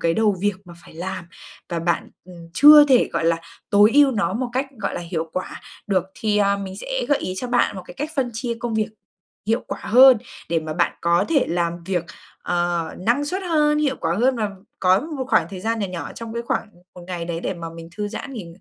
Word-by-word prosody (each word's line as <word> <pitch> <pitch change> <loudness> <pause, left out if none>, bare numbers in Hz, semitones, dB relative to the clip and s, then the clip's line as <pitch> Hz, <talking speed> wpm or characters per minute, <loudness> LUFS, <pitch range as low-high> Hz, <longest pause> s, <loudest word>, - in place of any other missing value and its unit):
cái 165 0 +1
đầu 210 -1 +2
việc 205 0 +1
mà 175 -2 -12
phải - - -15
làm, 185 +2 -5 0.4
và 170 - -2
bạn, 170 0 -1
ừm, 170 -2 -12
chưa 295 +1 +9
thể, 255 -3 +5
gọi - - -1
là, 165 0 +3 0.3
tối 205 +1 +6
ưu 285 -1 +6
nó 200 -8 0
một 245 +2 -2
cách, 260 +3 0
gọi 200 -2 -3
là, - - -3
hiệu 165 -2 -4
quả 185 - -5 0.3
được. 185 -3 +1
Thì, 210 -1 0
à, 200 -1 +3
mình 190 -1 -6
sẽ - - -3
gợi 290 - +3
ý 185 - -4
cho 250 - -3
bạn 245 -4 +1
một 185 - -6
cái - - -11
cách 295 +2 -4
phân 255 -3 0
chia 235 +1 -3
công 240 -2 -3
việc 215 -1 0 0.6
hiệu 225 +3 +1
quả - - -5
hơn, 255 +2 +7 0.3
để 165 -1 +1
mà 155 0 -5
bạn 175 - +1
có 170 +2 +2
thể 300 -4 +2
làm 170 0 -2
việc, 180 -2 -1 0.4
ờ, 175 -2 0
năng 235 +9 +1
suất 370 +6 -3
hơn, 300 -4 +2
hiệu 285 -3 +1
quả 165 +1 0
hơn, 250 +6 +2
và 215 -3 -1 0.3
có 185 +1 +4
một 300 -3 -5
khoảng - - +3
thời 190 -2 -7
gian 225 +3 -1
nhỏ 205 - -1
nhỏ 180 -2 -6
trong 230 -1 -7
cái 235 - -2
khoảng 235 - -2 0.3
một 180 - -11
ngày 175 -2 -4
đấy 170 -1 -4
để 190 - -3
mà 165 -1 -7
mình 165 0 -10
thư 210 -1 -2
giãn 230 +6 -7
nghỉ 220 -9 -6
205 Hz, 240 wpm, -22 LUFS, 175-250 Hz, 0.6 s, chưa